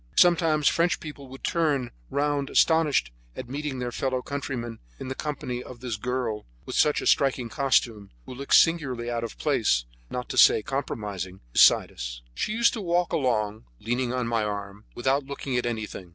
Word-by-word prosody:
Sometimes 165 -4 +4
French 170 +1 +2
people 145 -3 -9
would 135 +1 -12
turn 145 -7 0 0.2
round 145 -1 0
astonished 160 - +3 0.2
at 130 - -6
meeting 140 +1 -4
their 125 -1 -3
fellow 130 0 -2
countrymen 125 -5 -4 0.2
in 130 - -6
the - - -2
company 130 -4 -4
of 125 -1 -10
this 125 -2 -3
girl 120 - -3 0.2
with - - -5
her 150 - +1
striking 130 -4 +2
costume, 115 -6 +1 0.2
who - - -8
looked 140 +2 +1
singularly 130 -8 +3
out 115 -1 -2
of 115 - -6
place, 110 - +1 0.2
not 125 0 -4
to - - +1
say 110 - +7
compromising, 100 -8 -4
beside - - +6
us. - - -7
She 210 - -2
used 230 +2 +3
to 225 - -4
walk 175 -1 0
along, 110 - 0
leaning 120 +2 -1
on 125 -1 -1
my 115 -2 +1
arm, 100 0 -5
without 135 +3 +1
looking 140 -2 -4
at 125 -1 0
anything. 110 -5 -5
125 Hz, 175 wpm, -26 LUFS, 115-145 Hz, 0.2 s, say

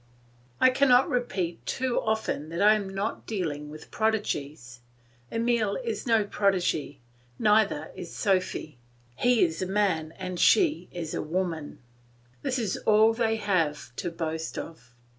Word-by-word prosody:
I 255 - +6
cannot 255 -1 +4
repeat 190 -9 -2
too 255 -1 -1
often 220 -8 -2
that 170 +1 -5
I 210 +2 +6
am 205 -3 -2
not 195 +3 -4
dealing 155 -8 -3
with 155 +1 -11
prodigies. 150 - -2 0.5
Emile 230 -3 +1
is 230 0 -4
no 225 -2 +4
prodigy, 185 -8 0 0.4
neither 210 -7 +2
is 175 -2 -8
Sophy. 185 - -1 0.4
He 245 - +3
is 160 0 -4
a 185 - -1
man 185 -6 0
and 185 -2 -5
she 325 -5 +3
is 165 -3 -5
a - - -2
woman; 165 -2 -3 0.6
this 255 - -1
is 220 -6 -1
all 220 +1 +4
they 225 -1 +1
have 165 - -1
to 175 - -2
boast 160 -1 -4
of. 125 -7 -9
190 Hz, 140 wpm, -27 LUFS, 160-220 Hz, 0.6 s, I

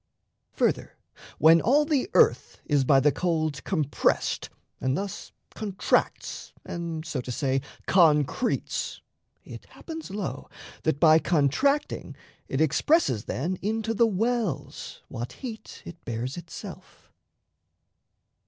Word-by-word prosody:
Further, - - 0 0.4
when 165 +1 +6
all 290 +6 +4
the 300 +2 0
earth - - +3
Is 145 -2 +2
by 135 +1 +5
the 150 +2 +4
cold 155 -5 -1
compressed, 155 -7 0 0.3
and 130 +2 0
thus 200 -1 -5 0.2
contracts 200 -3 -1
And, 170 -2 -5
so 150 -5 -3
to 125 - -6
say, 135 +1 0 0.2
concretes, 160 - +2 0.4
it - - -10
happens, 320 - -9
lo, 200 -1 -5 0.4
That 155 -3 +1
by 160 -1 +7
contracting 175 - +1 0.3
it 135 - -1
expresses 160 - +2
then 175 +8 -2
Into 220 +2 -1
the 230 +1 +4
wells 225 0 -2
what 120 +2 -6
heat 235 -5 -8
it 170 - -10
bears 120 +3 -4
itself. 170 -1 -10
170 Hz, 115 wpm, -26 LUFS, 145-220 Hz, 0.4 s, by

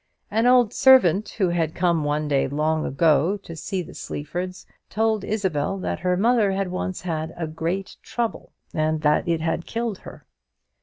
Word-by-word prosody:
An 225 +3 +2
old 245 -3 +5
servant, 215 -7 +5
who 190 -4 +2
had 165 -2 -1
come 170 -3 +1
one 150 +1 -1
day, 140 -2 +1
long 155 +3 0
ago, 160 +6 +2
to 165 - -9
see 185 +3 -3
the - - -12
Sleafords, 180 +5 -5 0.2
told 220 -1 0
Isabel 190 -5 -1
that 185 - -3
her 180 +1 0
mother 220 -1 +3
had 195 -1 -1
once 185 0 -3
had 160 -2 -3
a 170 - -2
great 165 +5 -4
trouble, 235 -2 -4 0.2
and 155 0 0
that 150 +2 +2
it 165 -2 0
had 165 +1 -2
killed 230 -3 -3
her. - - -12
180 Hz, 170 wpm, -23 LUFS, 155-205 Hz, 0.2 s, old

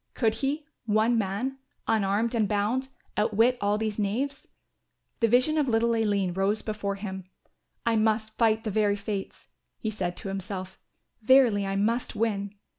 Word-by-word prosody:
Could 225 -3 +2
he, 275 +6 -2 0.2
one 220 +3 +3
man, 225 +6 -1 0.3
unarmed 220 +1 +1
and 220 -3 +2
bound, 215 +6 0 0.3
outwit 225 +4 +3
all 205 +1 +2
these 215 -1 -2
knaves? 250 +8 -2 0.7
The 230 - +4
vision 255 +7 +3
of 290 - +1
little 230 0 +2
Aline 205 -5 +1
rose 195 +3 0
before 205 -2 -3
him. 190 -2 -6 0.6
"I 230 -1 +3
must 220 0 +1
fight 225 -1 +2
the 215 - -2
very 205 0 +2
fates," 200 -1 -5 0.3
he 220 - -3
said 180 -4 -3
to - - -7
himself, 190 -1 -5 0.4
"verily, 225 -4 +5
I 195 - -2
must 225 +5 0
win." 205 -2 -1
215 Hz, 155 wpm, -27 LUFS, 200-230 Hz, 0.7 s, verily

